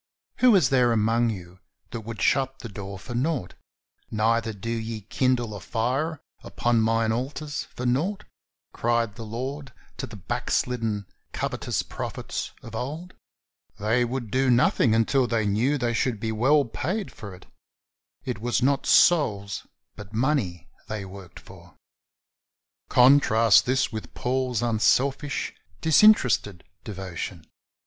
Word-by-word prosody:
"Who 250 -4 +6
is 165 -10 +4
there 125 -3 +3
among 115 +1 +2
you 90 -3 -7 0.3
that 115 - -5
would 110 0 -6
shut 135 -1 +1
the 115 - -7
door 100 -1 -7
for 110 +6 -8
nought? 125 - -1 0.6
neither 115 +1 +1
do 110 +2 -6
ye 115 -1 -4
kindle 120 +1 0
a 100 - -6
fire 130 - -1 0.2
upon 120 -1 +1
mine 115 0 +2
altars 145 +5 -3
for 125 - -4
nought," 155 +12 0 0.5
cried 115 -2 0
the 115 - -8
Lord 130 +5 -5 0.3
to - - -4
the 110 - -10
backslidden, 110 +2 -2 0.3
covetous - - -2
prophets - - -5
of 115 - -10
old. 150 +10 -5 0.6
They 115 +4 +1
would 120 -2 -4
do 130 +1 +2
nothing 120 -1 +3
until 125 +3 +2
they 115 -2 0
knew 115 +8 +1
they 120 -2 -1
should 115 -1 0
be 110 +1 -2
well 135 +6 +3
paid 185 - -3
for 100 -4 -9
it. 90 - -16 0.8
It 125 -5 -4
was 120 +1 0
not 140 +1 +1
souls, 105 - +3 0.3
but 105 0 -11
money, 115 - 0 0.2
they 105 -2 -4
worked 95 -2 -11
for. - - -16 1.1
Contrast 125 -5 +5
with 125 -4 0
this - - -16
Paul's 125 -2 -1
unselfish, 130 +5 +1 0.3
disinterested 145 - +4 0.2
devotion. 95 -4 -6
115 Hz, 135 wpm, -25 LUFS, 110-130 Hz, 1.1 s, Who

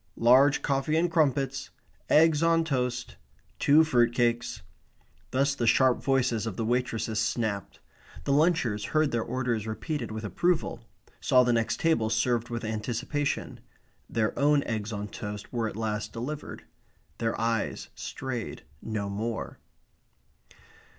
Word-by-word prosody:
Large 130 +5 +5
coffee 140 +2 +1
and 170 +1 +1
crumpets. 135 -4 +1 0.4
Eggs 155 0 +5
on 165 0 +3
toast. 125 -5 -2 0.4
Two 150 +3 +6
fruit 120 -6 +2
cakes." 120 -2 0 0.7
Thus 140 +2 +1
the 120 -4 -1
sharp 130 +1 +4
voices 125 -5 +1
of 100 - -5
the 115 - -1
waitresses 115 -2 -1
snapped. 105 -2 -2 0.4
The 140 - +1
lunchers 145 -9 +2
heard 155 -1 +3
their 115 - 0
orders 120 -3 -2
repeated 150 +8 -3
with 110 0 -5
approval; 175 - 0 0.4
saw 125 0 +4
the 120 -1 +2
next 115 -1 0
table 160 -10 +2
served 115 +1 +1
with 115 -1 -4
anticipation. 120 +7 -2 0.5
Their 110 -2 0
own 145 0 +4
eggs 110 -1 -3
on 105 -1 -4
toast 105 +1 -7
were 115 -2 0
at - - -10
last 105 -1 -3
delivered. 140 +6 -6 0.6
Their 115 -1 -1
eyes 115 -2 -1
strayed 130 -4 -5 0.2
no 105 -2 -3
more. 110 +3 -4
120 Hz, 135 wpm, -28 LUFS, 110-140 Hz, 0.7 s, Two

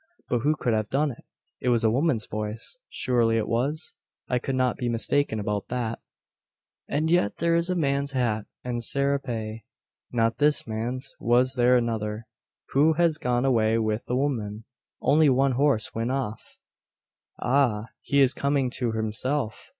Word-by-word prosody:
But 120 - +1
who 150 +6 +2
could 120 -5 -1
have 110 -1 -1
done 145 +2 +1
it? 120 - -13 0.3
It 125 - 0
was 120 -2 +2
a 110 - +4
woman's 130 -3 +1
voice. 110 - -5
Surely 115 -3 +1
it 110 - -1
was? 140 +8 -1 0.3
I 125 - +1
could 135 +2 -3
not 130 -1 +1
be 120 - -2
mistaken 115 +1 +1
about 105 -1 -2
that. 120 -2 -3 0.9
"And 155 +3 0
yet 170 -12 +2
there 170 +1 +1
is 170 +1 +1
a 180 - +1
man's 140 -3 0
hat, 115 -5 0 0.2
and 125 -1 -2
a - - -5
serape, 120 -5 -1 0.5
not 115 -1 +1
this 150 0 +3
man's! 120 +4 -4
Was 125 +2 +3
there 125 0 +4
another, 110 -2 -2 0.4
who 150 +4 +4
has 165 -1 +2
gone 125 +1 0
away 115 -4 +3
with 110 0 -1
the 125 - -1
woman? 115 -6 -2 0.4
Only 150 +1 +5
one 135 +1 +3
horse 130 -3 +2
went 115 +2 -2
off. 130 -5 -4 0.8
"Ah! 120 -5 +1
he 140 0 +2
is 135 -1 +5
coming 140 -3 0
to 120 -3 -2
himself! 110 +3 -2
125 Hz, 165 wpm, -26 LUFS, 110-140 Hz, 0.9 s, Only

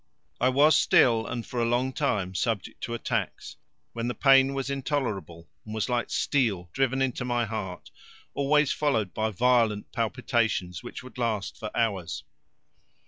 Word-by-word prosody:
I 130 - +3
was 145 +3 +5
still 115 -2 +4
and 120 -1 -4
for 120 - -3
a - - +2
long 125 +2 0
time 105 - -1
subject 110 +1 -2
to 120 -1 -4
attacks, 115 - -3 0.4
when 115 0 -3
the 125 - -2
pain 135 0 +5
was 135 -1 -2
intolerable 120 - -3 0.2
and 110 0 -7
was 110 - -1
like 120 -1 0
steel 100 - 0
driven 135 0 +1
into 125 -1 -2
my 120 -1 0
heart, 100 -4 -6 0.4
always 145 +1 +2
followed 110 -11 0
by 110 0 0
violent 115 -1 +2
palpitations, 115 -6 -1
which 120 - -8
would 130 0 -12
last 110 -4 -1
for 110 -2 -6
hours. 100 -8 -1
120 Hz, 155 wpm, -27 LUFS, 110-130 Hz, 0.4 s, was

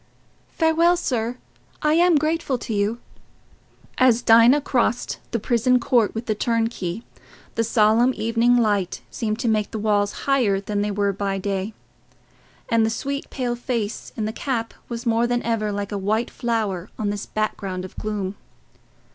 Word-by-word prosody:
"Farewell, 335 +2 +4
sir. 245 -7 -2 0.5
I 300 0 +3
am 345 0 +5
grateful 310 -3 0
to 230 - -5
you." 210 +3 0 1.0
As 245 -2 +4
Dinah 230 +5 +6
crossed 245 -3 0
the 235 - -1
prison 240 +3 +2
court 235 -4 +2
with 225 +2 -4
the 220 - 0
turnkey, 225 -3 -1 0.5
the 230 - 0
solemn 225 +2 +4
evening 230 +2 +2
light 200 - +1
seemed 215 -2 -2
to 245 - -1
make 215 -2 +1
the 220 - -5
walls 205 -1 0
higher 245 -8 +2
than 205 +1 -2
they 205 - 0
were 200 0 0
by 195 0 -2
day, 195 +2 -3 0.9
and 230 -1 +3
the 220 - +2
sweet 280 +5 -4
pale 245 -3 -2
face 235 -3 -3
in 220 - -1
the 215 - -3
cap 235 -3 -3 0.2
was 235 0 -5
more 230 0 +2
than 245 0 0
ever 220 -2 0
like 205 0 -4
a 205 - -2
white 215 +5 0
flower 215 -6 -2
on 205 -2 -1
this 205 0 -5
background 195 -4 -3
of 185 - -11
gloom. 205 -3 -3
225 Hz, 165 wpm, -23 LUFS, 205-245 Hz, 1.0 s, Dinah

